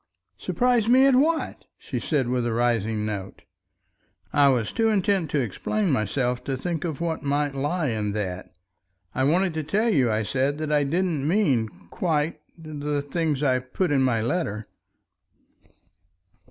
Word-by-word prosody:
"Surprise 245 -3 +1
me 260 +2 +6
at 275 - +5
what?" 315 +5 +1
she - - -5
said 140 -6 0
with 125 0 0
a 120 - -1
rising 115 -2 0
note. 100 -3 -5 0.9
I 145 -1 +5
was 120 -5 +1
too 225 0 +1
intent 195 -5 +1
to 150 - 0
explain 180 - -1
myself 125 +1 0
to 135 -1 -2
think 165 +2 -3
of 165 -3 -4
what 165 -1 -2
might 145 0 0
lie 145 +3 -1
in 105 -3 -2
that. 95 -3 -4 0.6
"I 130 - 0
wanted 175 +4 +2
to 155 0 -2
tell 210 +10 +1
you," 125 -6 +3
I 110 +1 0
said, 135 +6 0
"that 155 -1 -3
I 145 -1 +3
didn't 160 -2 0
mean 145 - +2 0.2
quite... 155 -2 -1 0.2
the 150 -2 -3
things 150 -1 -1
I 130 -3 +3
put 140 +7 -2
in 140 -2 +3
my 125 -4 +2
letter." 110 - -2
145 Hz, 160 wpm, -25 LUFS, 120-170 Hz, 0.9 s, me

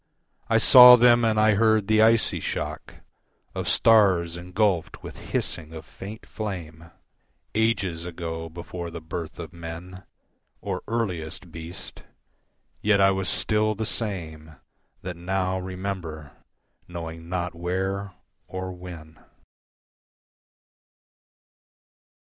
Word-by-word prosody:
I - - +3
saw 125 -1 +10
them 120 0 +5
and 110 -1 +2
I 110 0 +5
heard 110 0 +3
the 110 0 +4
icy 115 0 +3
shock - - -4 0.6
Of - - -3
stars 95 -7 +4
engulfed 90 0 -1
with - - -9
hissing 80 -2 -3
of 80 -1 -9
faint 105 +7 -10
flame 85 -6 -6 0.6
Ages 100 -7 0
ago 80 -1 -5
before 85 +1 -7
the 85 0 -7
birth 80 0 -6
of 85 -2 -8
men 85 +2 -8 0.6
Or - - -4
earliest 90 -6 -3
beast. 85 +2 -9 0.8
Yet 105 -1 +3
I 95 0 +5
was 95 0 -2
still 110 0 +1
the 110 +2 -3
same 80 -9 -5 0.5
That 90 -2 -5
now 95 +1 -1
remember, 90 -5 -6 0.6
knowing 85 -1 -7
not 90 -1 -2
where 95 +3 -3 0.3
or 95 0 -5
when. 85 -3 -11
90 Hz, 110 wpm, -25 LUFS, 85-105 Hz, 0.8 s, saw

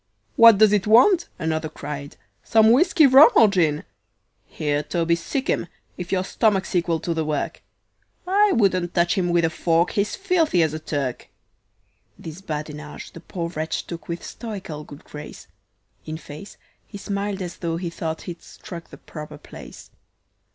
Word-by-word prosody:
"What 230 -3 +8
does 215 0 +5
it 205 -1 +1
want?" 335 - +5
another 160 0 -2
cried. 145 -2 -8 0.3
"Some 220 0 +4
whiskey, 315 +4 +5
rum 275 +3 +8
or 225 - +7
gin?" 165 -7 +1 0.6
"Here, 145 -1 -2
Toby, 170 +2 -1
sic 260 - -4
'em, - - 0 0.3
if 180 -1 -7
your 185 -1 +1
stomach's 195 -2 0
equal 170 -2 +1
to 170 - -2
the 160 -1 -1
work 150 -2 -3 0.6
I 405 +3 +3
wouldn't 185 -5 +1
touch 170 -1 +3
him 180 -2 0
with 170 -1 +2
a 160 - 0
fork, 165 +1 +1
he's 205 -1 -1
filthy 345 - +2
as 155 -1 -1
a 155 - -4
Turk." 140 -5 -4 0.9
This 165 +3 -9
badinage 150 -3 -7
the - - -11
poor 170 0 -5
wretch 160 -1 -3
took 165 -3 -8
with 170 0 -5
stoical 195 -10 -7
good 145 +2 -13
grace; 150 0 -10 0.6
In 155 0 -4
face, 155 +4 -11 0.3
he 205 - -9
smiled 200 -1 -3
as 175 -1 -7
tho' 165 -2 -3
he 170 -1 -4
thought 160 -1 -5
he'd 175 -1 -8
struck 170 -2 -11
the - - -12
proper 150 -2 -10
place. - - -13
170 Hz, 165 wpm, -23 LUFS, 155-205 Hz, 0.9 s, What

